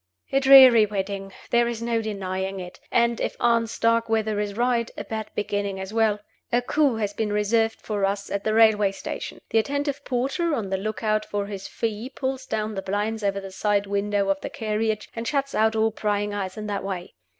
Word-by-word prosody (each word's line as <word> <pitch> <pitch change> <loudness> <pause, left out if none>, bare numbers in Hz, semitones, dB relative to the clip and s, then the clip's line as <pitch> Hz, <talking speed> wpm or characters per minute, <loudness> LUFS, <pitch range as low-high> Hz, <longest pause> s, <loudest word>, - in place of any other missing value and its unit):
A 270 - +3
dreary 260 -5 +8
wedding 195 -1 -4 0.2
there 235 0 +4
is 235 -1 -3
no 230 0 0
denying 195 -2 -3
it 180 -1 -9
and 235 -1 +2
(if - - -2
Aunt 230 -1 +2
Starkweather 225 -2 +1
is 205 -1 -2
right) 240 -1 +1
a - - -4
bad 220 -1 -5
beginning 205 -1 -2
as 190 +2 -6
well! 220 -2 +2 0.3
A 240 +1 +2
coup 285 -1 +2
has 210 -2 -2
been 210 0 -2
reserved 225 +2 +1
for 205 -2 -3
us 200 +1 0
at 200 0 -2
the 215 0 0
railway 215 -3 +5
station. - - -6
The 225 - +4
attentive 285 +3 -2
porter, 275 +7 0
on 200 -6 -4
the 190 - +1
look 215 +3 -4
out 215 0 +1
for 205 -1 -3
his 200 -1 -6
fee 225 +2 -3
pulls 265 -1 -4
down 215 0 -2
the 195 - -3
blinds 210 +3 -2
over 200 0 0
the 195 -1 -8
side 205 +1 +1
windows 200 0 0
of 195 0 -2
the - - -4
carriage, 215 0 -2
and 230 0 -4
shuts 275 0 -1
out 220 +1 +2
all 220 0 +2
prying 205 -1 -1
eyes 195 -1 -4
in 215 - -5
that 200 -2 -3
way. 185 -2 -5
215 Hz, 205 wpm, -24 LUFS, 200-230 Hz, 0.3 s, dreary